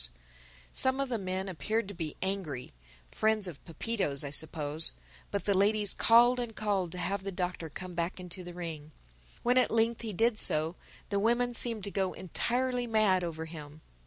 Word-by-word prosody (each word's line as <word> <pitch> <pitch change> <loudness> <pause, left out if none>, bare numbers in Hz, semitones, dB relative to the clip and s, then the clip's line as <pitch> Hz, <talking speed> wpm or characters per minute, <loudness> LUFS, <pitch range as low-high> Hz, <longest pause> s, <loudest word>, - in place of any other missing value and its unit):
Some 260 +1 +3
of 275 -1 0
the 235 -3 -1
men 190 0 -2
appeared 205 +5 -1
to - - -6
be 160 -4 -5
angry 185 -10 -3 0.4
(friends 215 -2 +2
of 165 -6 -9
Pepito's, 165 -4 0
I 140 - -4
suppose); 155 0 0 0.4
but 200 - -2
the 200 - +3
ladies 205 +1 +3
called 240 +2 +6
and 235 -3 -4
called 200 -5 0
to - - -6
have 190 +3 -1
the 195 +1 -4
Doctor 180 -3 -3
come 180 +4 -7
back 170 +2 -2
into 180 +1 -7
the 175 0 -8
ring. 155 -4 -6 0.5
When 245 +1 +5
at - - +3
length 230 0 +2
he 225 -2 -3
did 225 +3 +2
so, 155 +3 +1 0.3
the 200 -1 +1
women 240 +3 +2
seemed 230 -3 +1
to 200 - -3
go 190 -2 0
entirely 245 +7 0
mad 215 -5 +3
over 160 -1 -3
him. 155 -2 -9
190 Hz, 185 wpm, -31 LUFS, 170-225 Hz, 0.5 s, called